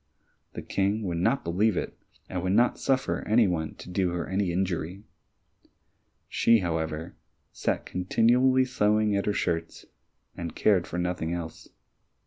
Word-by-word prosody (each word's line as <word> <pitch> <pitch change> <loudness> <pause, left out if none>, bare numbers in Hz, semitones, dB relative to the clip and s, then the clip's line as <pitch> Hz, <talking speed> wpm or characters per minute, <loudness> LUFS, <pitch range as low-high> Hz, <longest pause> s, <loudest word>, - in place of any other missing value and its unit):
The - - -6
King 100 +3 0
would 85 -4 -2
not 115 +10 +1
believe 95 +4 +1
it, - - -3 0.3
and 90 - -3
would 95 +1 0
not 120 +4 +3
suffer 135 -1 0
any 110 0 +4
one 80 -3 -2
to - - -12
do 90 0 0
her 85 - -3
any 95 -1 0
injury. 90 +1 -2 1.2
She, 115 -2 +3
however, 80 -1 -3 0.4
sat - - -2
continually 125 +8 +3
sewing 105 -3 +2
at 100 - 0
the 105 - +1
shirts, 85 -4 -2 0.5
and 85 -1 -6
cared 95 -5 +2
for 85 - -5
nothing 90 -2 -2
else. 85 -2 -6
95 Hz, 145 wpm, -27 LUFS, 85-110 Hz, 1.2 s, any